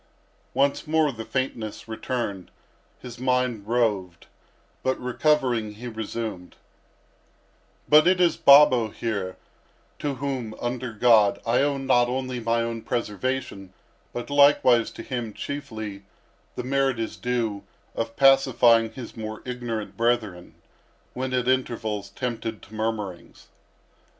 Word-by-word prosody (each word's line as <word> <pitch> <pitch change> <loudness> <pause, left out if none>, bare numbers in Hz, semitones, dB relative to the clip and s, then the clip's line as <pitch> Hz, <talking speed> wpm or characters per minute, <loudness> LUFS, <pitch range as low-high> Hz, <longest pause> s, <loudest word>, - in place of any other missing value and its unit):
Once 140 +3 +1
more 155 -1 +2
the 115 -3 -7
faintness 115 -5 -4
returned—his 115 +1 -7
mind 125 -4 0
roved—but, 110 +2 -3
recovering, 125 -4 +1
he 120 +4 -8
resumed: 110 -4 -5 1.3
"But 150 +2 +6
it 185 0 +4
is 175 -2 +4
Babo 140 -5 +6
here 100 -4 -4 0.6
to 145 -2 -2
whom, 130 -5 -4
under 120 0 -3
God, 110 -2 +4
I 115 +3 +2
owe 140 0 +1
not 130 -3 +3
only 130 0 -3
my 115 0 0
own 115 -1 -4
preservation, 115 -4 -3 0.4
but 120 +3 -6
likewise 140 -5 +5
to - - -9
him, 120 -4 -4
chiefly, 110 -9 -6 0.5
the 125 - -4
merit 135 -1 +1
is 115 -1 -4
due, 115 -5 -2 0.3
of 115 0 -4
pacifying 125 -4 +5
his 120 -1 -9
more 110 -1 -6
ignorant 120 -4 -4
brethren, 115 -7 -1 0.6
when 130 +1 -3
at 125 -1 0
intervals 115 -5 -1
tempted 115 -3 -4
to 105 - -15
murmurings." 110 -5 -5
120 Hz, 115 wpm, -25 LUFS, 110-130 Hz, 1.3 s, But